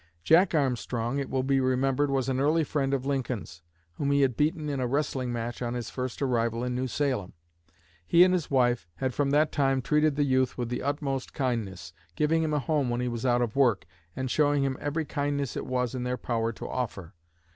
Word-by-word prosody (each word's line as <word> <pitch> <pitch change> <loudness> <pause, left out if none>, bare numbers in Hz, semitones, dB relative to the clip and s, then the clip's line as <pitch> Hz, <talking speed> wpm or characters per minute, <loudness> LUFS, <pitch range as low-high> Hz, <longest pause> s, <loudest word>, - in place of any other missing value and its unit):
Jack 170 +2 +5
Armstrong, 125 -2 0
it 140 - -3
will 130 -1 0
be 135 0 +2
remembered, 130 +2 +1
was 135 -2 0
an 130 -1 0
early 155 +4 +3
friend 140 -2 -1
of 135 -1 -1
Lincoln's, 125 -10 -3 0.4
whom 140 - -1
he 140 0 +3
had 130 -3 +2
beaten 155 +2 0
in 140 -2 -2
a 125 - 0
wrestling 130 -2 -1
match 120 0 -4
on 120 0 -2
his 120 -2 -4
first 130 +1 -4
arrival 115 -2 0
in 125 0 -2
New 130 +1 -1
Salem. 130 -8 -1 0.7
He 170 +1 +7
and 185 0 +4
his 175 -5 -1
wife 120 - +2
had 130 -1 -2
from 140 +1 0
that 150 +2 +3
time 135 -2 +2
treated 150 +3 +2
the 145 - +2
youth 130 -2 +1
with 120 -2 -2
the 125 - -3
utmost 140 -2 -3
kindness, 100 - -3 0.2
giving 160 +2 +2
him 160 -1 0
a 150 - +1
home 145 -1 0
when 120 0 -1
he 125 - -1
was 120 +1 -2
out 120 0 +3
of 115 -2 -3
work, 125 -8 +3 0.3
and 130 -1 -3
showing 145 -2 +3
him 135 -1 0
every 155 +2 -2
kindness 145 -2 -2
it - - -4
was 125 -1 -1
in 130 - -3
their 125 0 -2
power 115 -2 -1
to - - -8
offer. 100 -8 -4
130 Hz, 220 wpm, -28 LUFS, 120-145 Hz, 0.7 s, He